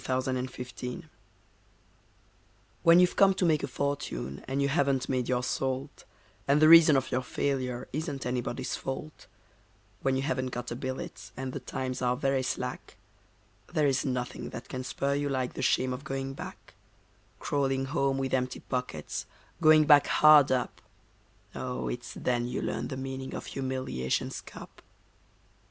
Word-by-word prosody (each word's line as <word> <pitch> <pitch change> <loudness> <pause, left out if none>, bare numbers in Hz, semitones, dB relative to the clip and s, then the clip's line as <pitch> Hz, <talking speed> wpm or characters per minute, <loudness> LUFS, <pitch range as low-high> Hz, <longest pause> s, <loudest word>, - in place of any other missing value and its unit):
The 130 0 0
Shame 130 0 -1
of 130 0 -3
Going 125 +2 -6
Back 155 - -21 1.7
When 165 +1 +7
you've 180 0 +4
come 195 -1 +5
to 185 - +1
make 155 -3 +3
a - - -2
fortune 140 - -3
and 135 +2 -1
you 140 - +2
haven't 140 -3 +1
made 125 -2 -1
your 125 -1 +1
salt, 130 +2 -3 0.4
And 140 +2 +4
the 155 - +6
reason 160 -3 +9
of 130 - -2
your 125 - +1
failure 130 -1 -2
isn't 150 -2 -3
anybody's 125 -1 -2
fault 135 +3 -6 0.7
When 135 -1 +1
you 135 - -1
haven't 130 -3 -1
got 125 -1 -5
a - - -2
billet, 130 +1 -6
and 130 -1 -4
the - - -3
times 130 -1 -4
are 125 0 +1
very 135 -1 +1
slack, 130 - -4 0.7
There 150 - +2
is 135 -2 +2
nothing 125 -3 -3
that 120 +2 -8
can 130 -1 -4
spur 140 +3 -1
you 145 0 -1
like 130 -2 -1
the - - -5
shame 130 0 +2
of 125 +3 -6
going 135 -1 -4
back; - - -9 0.6
Crawling 135 -2 0
home 135 -1 0
with 135 -1 -2
empty 130 -1 -1
pockets, 125 - -4 0.3
Going 155 -1 +7
back 145 -1 +7
hard 155 -2 +7
up; 125 -1 -1 0.7
Oh! 125 -1 -4
it's 120 0 -6
then 120 -1 0
you 125 - -3
learn - - -2
the 130 - -5
meaning 130 0 -5
of - - -6
humiliation's 130 - -2
cup. - - -12
130 Hz, 165 wpm, -29 LUFS, 125-140 Hz, 1.7 s, reason